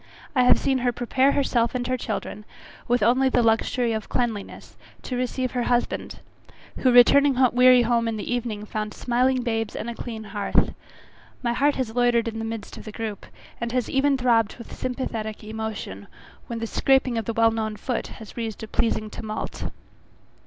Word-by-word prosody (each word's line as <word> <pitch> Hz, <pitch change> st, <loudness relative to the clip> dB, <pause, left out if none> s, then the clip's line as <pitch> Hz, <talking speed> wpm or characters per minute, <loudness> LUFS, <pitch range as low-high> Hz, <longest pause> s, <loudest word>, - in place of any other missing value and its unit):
I 255 Hz, -, +5 dB
have -, -, +7 dB
seen 270 Hz, -1 st, +1 dB
her 245 Hz, 0 st, +1 dB
prepare 260 Hz, +3 st, +2 dB
herself 245 Hz, -3 st, +1 dB
and 245 Hz, -1 st, -1 dB, 0.2 s
children, 210 Hz, -1 st, -4 dB, 0.4 s
with 245 Hz, -2 st, +2 dB
only 255 Hz, +4 st, +4 dB
the 245 Hz, -2 st, +2 dB
luxury 230 Hz, +1 st, +2 dB
of 220 Hz, -1 st, -4 dB
cleanliness, 230 Hz, -5 st, -3 dB, 0.3 s
to 255 Hz, -, -4 dB
receive 255 Hz, +1 st, -1 dB
her 250 Hz, -, -1 dB
husband, 240 Hz, 0 st, -1 dB, 0.6 s
who 255 Hz, -, +3 dB
returning 265 Hz, +3 st, +6 dB, 0.2 s
weary 250 Hz, 0 st, +6 dB
home 235 Hz, 0 st, +1 dB
in 225 Hz, -1 st, -2 dB
the 215 Hz, -, -3 dB
evening, 225 Hz, -4 st, -3 dB
found 215 Hz, 0 st, -4 dB
smiling 250 Hz, +1 st, +1 dB
babes 225 Hz, -2 st, -2 dB
and 235 Hz, -, -4 dB
a -, -, -5 dB
clean 230 Hz, -2 st, -6 dB
hearth. 205 Hz, -1 st, 0 dB, 0.7 s
My 235 Hz, -1 st, +1 dB
heart 280 Hz, +4 st, +2 dB
has 250 Hz, -4 st, -2 dB
loitered 240 Hz, -1 st, +3 dB
in 225 Hz, 0 st, -4 dB
the 225 Hz, -, -3 dB
midst 225 Hz, -2 st, -6 dB
of -, -, -10 dB
the 215 Hz, -, -7 dB
group, 215 Hz, -2 st, -5 dB, 0.3 s
and 235 Hz, 0 st, -2 dB
has 250 Hz, -2 st, -1 dB
even 275 Hz, +1 st, +3 dB
throbbed 230 Hz, -4 st, +2 dB
with 235 Hz, -, -10 dB
sympathetic 230 Hz, -4 st, -4 dB
emotion, 215 Hz, -, -6 dB, 0.4 s
when 235 Hz, -, -4 dB
the 230 Hz, -, -3 dB
scraping 265 Hz, +1 st, +2 dB
of 225 Hz, -, -5 dB
the 230 Hz, -, -2 dB
well 225 Hz, 0 st, +4 dB
known 220 Hz, -1 st, -2 dB
foot 245 Hz, +2 st, -3 dB
has 220 Hz, -3 st, -11 dB
raised 225 Hz, -2 st, -5 dB
a -, -, -5 dB
pleasing 215 Hz, -2 st, -1 dB
tumult. 215 Hz, 0 st, -5 dB
235 Hz, 180 wpm, -24 LUFS, 220-250 Hz, 0.7 s, have